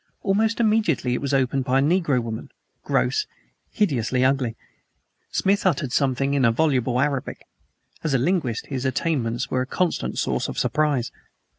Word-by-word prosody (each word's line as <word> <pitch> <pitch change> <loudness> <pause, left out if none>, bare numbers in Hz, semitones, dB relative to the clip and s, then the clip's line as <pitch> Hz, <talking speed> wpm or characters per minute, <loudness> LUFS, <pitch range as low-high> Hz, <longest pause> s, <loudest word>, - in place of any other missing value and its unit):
Almost 220 +4 +1
immediately 210 - +2
it - - -2
was 140 -1 -2
opened 135 0 +1
by 130 0 +1
a - - +4
negro 155 -4 +2
woman 110 -1 -6 0.3
gross, 425 0 0 0.4
hideously 130 - +1
ugly. 130 -4 +1 0.8
Smith 200 +1 +1
uttered 160 -8 +1
something 135 0 +1
in 130 -5 +3
voluble 125 -4 +1
Arabic. 140 -1 -2 0.6
As 155 -4 +1
a - - +5
linguist 130 - 0
his 135 -3 -4
attainments 130 -3 -1
were 130 - +1
a 130 - -3
constant 180 +4 -1
source - - 0
of - - -6
surprise. 145 -6 0
135 Hz, 150 wpm, -23 LUFS, 125-165 Hz, 0.8 s, a